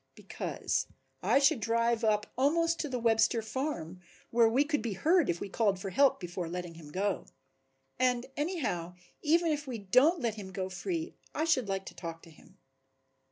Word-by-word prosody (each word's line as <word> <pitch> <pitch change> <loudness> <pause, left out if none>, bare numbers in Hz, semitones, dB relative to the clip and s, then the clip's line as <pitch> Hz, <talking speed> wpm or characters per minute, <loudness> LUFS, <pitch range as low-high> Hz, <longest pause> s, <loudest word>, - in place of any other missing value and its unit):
"Because - - -3 0.3
I - - +3
should 280 0 +4
drive 230 +1 +1
up 210 -1 +2
almost 330 +5 +2
to 300 - -2
the 255 - -2
Webster 225 0 +3
farm, 215 - -4 0.3
where 230 -1 +5
we 255 +5 +3
could 295 -2 -1
be 225 -2 -2
heard 325 - +3
if 170 0 0
we - - -4
called 200 -1 +1
for 195 0 -5
help 275 +8 +4
before 175 -1 -5
letting 175 -1 -5
him 160 -3 -12
go. 195 +4 -1 0.7
And 250 -1 +2
anyhow 255 - -2 0.3
even 330 +2 +3
if 295 -1 -2
we 250 -3 -3
don't 255 - +4
let 235 -5 0
him 200 -3 -8
go 190 -1 -3
free 330 - -3 0.2
I 310 - 0
should 260 -10 +2
like 195 0 -2
to - - -8
talk 165 -2 -7
to 165 - -14
him." 190 +4 -20
230 Hz, 185 wpm, -31 LUFS, 190-290 Hz, 0.7 s, where